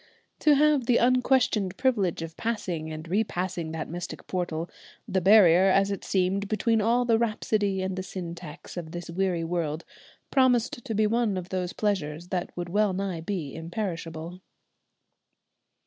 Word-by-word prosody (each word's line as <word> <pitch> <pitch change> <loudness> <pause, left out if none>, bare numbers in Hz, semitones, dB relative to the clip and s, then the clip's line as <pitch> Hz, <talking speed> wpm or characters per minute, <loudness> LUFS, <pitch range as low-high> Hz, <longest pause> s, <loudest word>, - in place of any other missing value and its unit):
To 300 -2 +5
have 290 -4 +3
the 240 - +4
unquestioned 245 -6 +2
privilege 205 -11 +1
of 165 0 -8
passing 180 -9 -3
and 155 +1 -7
repassing 180 -4 -1
that 160 -1 -4
mystic 175 +2 -6
portal, 175 -3 -2 0.4
the 190 - 0
barrier 190 -2 +7
as 195 +1 +3
it 200 - -4
seemed 195 +1 0
between 225 +1 +1
all 235 +3 +2
the 230 -2 +3
rhapsody 210 -4 0
and 190 0 -2
the 185 - -3
syntax 175 -3 -8
of 165 -1 -6
this 175 -1 -6
weary 180 -1 0
world, 165 -2 -2 0.5
promised 250 -3 +2
to 225 - -3
be 215 +1 +3
one 220 -2 +1
of 180 0 -5
those 180 -1 -2
pleasures 175 -5 -2
that 180 -2 -2
would 175 0 -4
well 205 +1 +2
nigh 185 -3 -3
be 165 -6 -4
imperishable. 165 -1 -5
185 Hz, 155 wpm, -27 LUFS, 170-215 Hz, 0.5 s, barrier